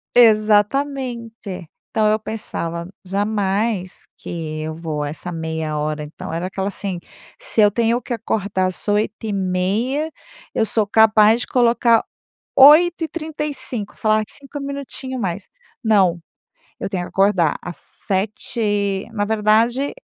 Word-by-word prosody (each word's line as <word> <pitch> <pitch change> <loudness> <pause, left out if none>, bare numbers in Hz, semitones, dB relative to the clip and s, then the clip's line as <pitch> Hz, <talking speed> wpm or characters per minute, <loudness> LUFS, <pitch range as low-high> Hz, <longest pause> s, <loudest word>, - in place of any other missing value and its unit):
Exatamente. 230 - +2 0.2
Então 215 -1 +2
eu 215 - +2
pensava: 170 -6 -4 0.2
"Jamais 200 0 -1
que 155 -2 -5
eu 155 0 -4
vou 155 -3 -3
essa 155 +4 -5
meia 160 -2 -3
hora". 150 0 -2
Então, 150 +1 -8
era 170 +2 -2
aquela 190 +1 -3
assim: 195 -2 -4 0.4
"Se - - +1
eu 205 -1 +6
tenho 235 +3 +1
que 250 - -4
acordar 205 -4 -1
às 185 - -4
8h30, 210 +6 0 0.4
eu 220 - +2
sou 220 0 +2
capaz 220 +1 +5
de - - -4
colocar 235 -2 +3 0.5
8h35". 305 - +3
Falar: 215 -1 +2
"5 285 +1 -8
minutinhos 275 -2 -5
mais". 190 -1 -3 0.3
Não. 195 -7 +3 0.6
Eu - - -3
tenho 185 -2 -2
que - - -9
acordar 195 -5 +2
às 175 - -7
sete 205 +4 -3
e 205 -2 0
Na 205 -2 0
verdade, 220 +5 +2
210 Hz, 125 wpm, -20 LUFS, 185-235 Hz, 0.6 s, eu